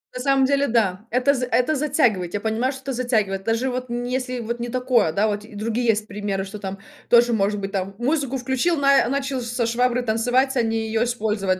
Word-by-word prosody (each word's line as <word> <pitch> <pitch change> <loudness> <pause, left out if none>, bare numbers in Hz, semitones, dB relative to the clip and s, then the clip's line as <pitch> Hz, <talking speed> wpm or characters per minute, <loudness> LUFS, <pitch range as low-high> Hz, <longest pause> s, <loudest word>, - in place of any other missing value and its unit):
На - - -4
самом 270 0 +3
деле 280 +1 +2
да, 215 -4 0
это 255 +3 +3
з 250 -2 -2
это 250 +4 +1
затягивает, 250 - +1
я 205 - -1
понимаю, 225 +5 0
что 270 -1 -9
это 270 -1 -3
затягивает, 215 -6 0
даже 230 +4 0
вот 255 0 -4
нь 240 +1 -3
если 255 0 -2
вот 235 +1 -4
не 240 0 -4
такое, 250 -7 +2
да 200 +6 +1
вот 205 -1 -2
другие 230 +3 -2
есть 215 -1 +1
примеры, 200 -2 -3
что 205 +2 -8
там 195 0 -6 0.3
тоже 240 0 +5
может 205 -1 +1
быть 195 0 -4
там 195 0 -2
музыку 270 +1 0
включил, 265 +7 0
на 275 -3 +4
начал 275 -1 -2
со 235 0 -2
шваброй 245 +2 +1
танцевать, 245 +4 +1
а 245 - +3
не 225 -1 -1
ее 225 +1 +1
использовать, 210 -6 -1
240 Hz, 215 wpm, -22 LUFS, 215-255 Hz, 0.3 s, тоже